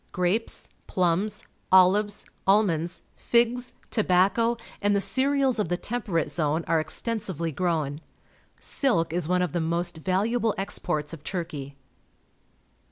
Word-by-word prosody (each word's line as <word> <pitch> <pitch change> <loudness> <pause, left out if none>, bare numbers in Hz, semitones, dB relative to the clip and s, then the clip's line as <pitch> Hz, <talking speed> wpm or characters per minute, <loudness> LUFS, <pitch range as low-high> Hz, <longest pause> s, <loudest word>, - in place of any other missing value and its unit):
Grapes, 180 +6 0 0.2
plums, 185 +3 0 0.3
olives, 195 +3 +5 0.2
almonds, 185 -4 +2
figs, 240 +1 +1 0.2
tobacco, 215 +3 +2 0.2
and 205 0 +2
the - - +3
cereals 260 +5 +2
of 210 - 0
the 175 - 0
Temperate 205 -8 -2
Zone 155 0 0
are 160 -1 +2
exten 230 - -2
sively 170 -5 -3
grown. 155 -3 -1 0.6
Silk 165 - 0
is 175 -2 -1
one 180 +1 +2
of 180 - -2
the 170 - -1
most 165 0 -2
valu 195 +5 +1
able 230 -3 +1
exports 165 -5 -1
of 155 -3 -9
Turkey. 155 -7 -5
185 Hz, 130 wpm, -26 LUFS, 165-215 Hz, 0.6 s, olives